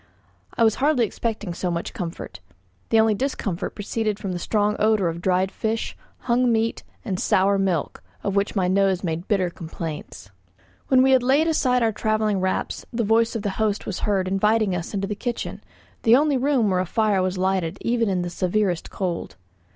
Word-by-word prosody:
I 230 - +4
was 220 -1 +5
hardly 280 -4 +3
expecting 215 -3 -3
so 180 +1 -2
much 170 0 -3
comfort; 180 -8 -6 0.5
the 225 - +4
only 220 0 +4
discomfort 205 -7 -3
proceeded 215 0 -2
from 195 -2 -4
the 175 - -3
strong 210 +3 +1
odour 215 -4 +3
of 165 +1 -5
dried 185 +1 +1
fish, 220 0 -2 0.3
hung 245 0 +2
meat, 225 0 0 0.2
and 190 -5 -2
sour 195 +1 +2
milk, 185 -6 -1 0.2
of 200 -1 -1
which 200 +2 0
my 185 -3 +2
nose 190 0 +2
made 170 +1 -3
bitter 185 -5 +1
complaints. 160 - -7 0.6
When 260 -1 +5
we 265 - +4
had 260 -1 +5
laid 270 +5 +3
aside 250 -6 +2
our 225 - +3
travelling 215 -1 0
wraps 185 0 -2
the 235 -1 -1
voice 225 +2 +2
of 220 - -3
the 205 - -1
host 215 -1 0
was 195 - -4
heard 195 -3 0
inviting 210 +1 +2
us 170 0 -4
to 205 - -4
the 195 +2 -2
kitchen, 240 +3 -4 0.4
the 230 +1 +6
only 290 +1 +3
room 255 -5 +2
where 185 - +2
a 185 - -1
fire 210 -1 +1
was 185 0 -1
lighted 185 -1 0
even 230 -2 +1
in 180 -2 0
the 175 - -4
severest 185 -1 0
cold. 180 -3 -4
205 Hz, 190 wpm, -23 LUFS, 185-225 Hz, 0.6 s, the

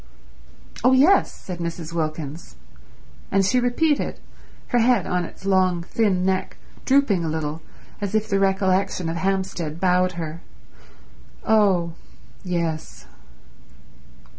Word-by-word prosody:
"Oh 255 - +5
yes," 300 +10 +5
said 180 -2 -8
Mrs. 170 -1 -5
Wilkins. 155 - -4 0.7
And 195 0 +2
she 250 +6 +3
repeated, 280 +5 0 0.5
her 245 - +2
head 245 +1 +3
on 180 -1 -1
its 190 - -12
long 185 -3 +2
thin 190 -1 0
neck 190 0 -1 0.3
drooping 260 -10 +3
a 160 - -1
little 155 0 -3 0.4
as 205 +1 -2
if 215 0 +1
the 195 - +1
recollection 190 -2 +1
of 165 - -3
Hampstead 185 -4 -2
bowed 180 0 +2
her, 165 -1 -6 1.0
"Oh 190 -6 +3 0.5
yes." 170 -4 -3
185 Hz, 115 wpm, -23 LUFS, 170-205 Hz, 1.0 s, Oh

